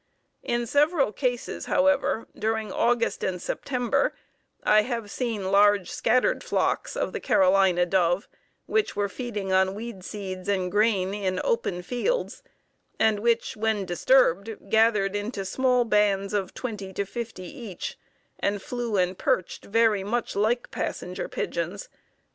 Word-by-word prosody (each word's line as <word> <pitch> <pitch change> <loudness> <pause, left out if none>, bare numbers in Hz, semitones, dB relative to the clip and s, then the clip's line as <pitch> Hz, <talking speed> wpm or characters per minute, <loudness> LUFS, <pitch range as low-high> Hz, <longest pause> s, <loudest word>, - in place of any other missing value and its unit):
In 240 0 -1
several 290 0 +2
cases, 245 +1 -2
however, 280 -5 +2
during 220 -1 -1
August 235 +2 +1
and 180 -1 -1
September 245 +5 -1 0.5
I 215 0 +5
have 230 -2 -4
seen 220 -7 -2
large 205 -1 +4
scattered 250 +3 +2
flocks - - -1
of - - -1
the - - -3
Carolina 185 -2 +4
dove 175 0 +1 0.4
which 435 -1 0
were 205 0 0
feeding 205 -5 -4
on 190 +1 +3
weed 220 -3 -7
seeds 190 -2 -6
and 185 -3 0
grain 205 -2 +2
in 190 -3 -1
open 460 - -1
fields, 255 - -2 0.6
and 220 -2 +3
which 235 +1 +1
when 215 -2 0
disturbed, 200 +1 +2
gathered 215 -3 +3
into 205 -1 -3
small 250 +3 +2
bands 205 -2 +2
of 195 -3 -2
twenty 210 -6 -5
to 200 - -2
fifty 225 -2 -6
each 205 -1 -7 0.4
and 200 0 0
flew 240 -4 -2
and 180 0 0
perched 185 - -1
very 220 -2 +2
much 235 +4 -2
like 220 +4 0
Passenger - - -4
Pigeons. - - -3
210 Hz, 135 wpm, -26 LUFS, 195-240 Hz, 0.6 s, I